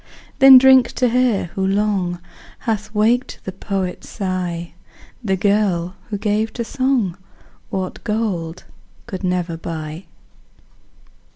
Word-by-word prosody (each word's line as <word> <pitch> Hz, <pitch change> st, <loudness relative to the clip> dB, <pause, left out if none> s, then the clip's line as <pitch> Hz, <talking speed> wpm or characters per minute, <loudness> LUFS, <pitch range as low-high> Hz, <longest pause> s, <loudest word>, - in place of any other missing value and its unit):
Then 270 Hz, 0 st, +10 dB
drink 260 Hz, -1 st, +6 dB
to 250 Hz, -1 st, +1 dB
her, 235 Hz, -8 st, +1 dB
who 195 Hz, -, -2 dB
long 195 Hz, -2 st, 0 dB, 0.4 s
Hath 215 Hz, -2 st, -2 dB
waked 230 Hz, +5 st, +1 dB
the 190 Hz, -, -5 dB
poet's 190 Hz, -1 st, -4 dB
sigh, 180 Hz, -4 st, -3 dB, 0.5 s
The 195 Hz, -3 st, +1 dB
girl, 190 Hz, -3 st, +1 dB, 0.2 s
who 205 Hz, -, -2 dB
gave 215 Hz, +2 st, 0 dB
to 235 Hz, -, -3 dB
song 255 Hz, -8 st, 0 dB, 0.5 s
What 185 Hz, -1 st, -4 dB
gold 185 Hz, -6 st, -2 dB, 0.4 s
could 190 Hz, 0 st, -7 dB
never 180 Hz, -2 st, -1 dB
buy. 160 Hz, +1 st, -6 dB
195 Hz, 115 wpm, -20 LUFS, 180-225 Hz, 0.5 s, Then